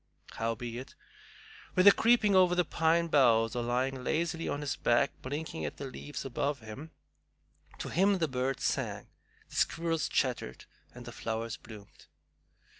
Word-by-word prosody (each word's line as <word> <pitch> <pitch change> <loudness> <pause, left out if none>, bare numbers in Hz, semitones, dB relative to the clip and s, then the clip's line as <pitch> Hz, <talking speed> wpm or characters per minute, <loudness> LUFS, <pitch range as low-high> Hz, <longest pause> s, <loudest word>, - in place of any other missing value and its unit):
Howbeit, 115 +2 -4 0.8
whether 185 +2 +8
creeping 220 -2 +3
over 180 -1 +5
the 180 -1 +2
pine 165 +1 +2
boughs 120 -8 +3
or 120 - 0
lying 125 +2 -1
lazily 165 +3 -1
on 145 - -2
his 145 - -2
back 120 0 +2
blinking 145 - -5
at 75 - -4
the 140 - -6
leaves 140 +1 -7
above 140 +2 -1
him, 115 +7 -9 0.9
to - - -5
him 195 +3 +3
the 165 -3 +1
birds 130 0 -2
sang, - - -2 0.4
the - - -12
squirrels 165 -1 0
chattered, 125 - -1 0.3
and 125 0 -10
the 120 - -7
flowers 115 0 -4
bloomed. 110 -4 -14
135 Hz, 145 wpm, -31 LUFS, 120-165 Hz, 0.9 s, whether